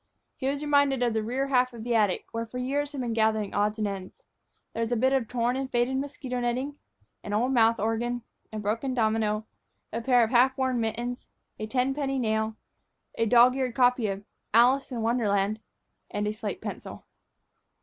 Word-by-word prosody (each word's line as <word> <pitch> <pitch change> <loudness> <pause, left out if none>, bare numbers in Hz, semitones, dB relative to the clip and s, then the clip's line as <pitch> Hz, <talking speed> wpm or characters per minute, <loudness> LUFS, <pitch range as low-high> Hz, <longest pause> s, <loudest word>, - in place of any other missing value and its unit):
He 265 - -3
was 280 +2 -1
reminded 285 -3 +3
of 240 -2 +1
the 220 - 0
rear 260 +5 -2
half 255 -1 +2
of 230 -2 -8
the 240 0 -1
attic, 210 -5 +2
where 230 0 -3
for 250 - -7
years 280 +3 -1
had 280 -3 -4
been 235 -2 -2
gathering 220 -2 +1
odds 210 +1 +1
and 215 -1 0
ends. 195 -2 -7 0.5
There 230 - -3
was 230 +1 -1
a - - +2
bit 260 +4 +2
of 260 -4 +1
torn 245 +1 0
and 265 0 -3
faded 245 +2 +1
mosquito 270 -2 -4
netting, 255 +4 -2 0.4
an 205 - -5
old 240 +5 +1
mouth 230 -1 +4
organ, 230 +3 -1 0.3
a 215 - -5
broken 225 +5 -2
domino, 220 -2 +1 0.5
a 230 - -2
pair 245 0 +4
of 225 - -1
half 260 +2 +4
worn 260 -2 0
mittens, 235 +3 -3 0.3
a 215 - -3
ten 255 +3 +1
penny 270 -1 -2
nail, 220 -2 0 0.6
a 230 - 0
dog 245 +3 +6
eared 255 -3 -2
copy 250 -3 +3
of 195 0 -4 0.3
"Alice 255 +4 +4
in 235 -3 -3
Wonderland," 215 -3 +1 0.5
and 205 0 -2
a 210 - -1
slate 215 - -5
pencil. - - -7
240 Hz, 195 wpm, -27 LUFS, 220-260 Hz, 0.6 s, dog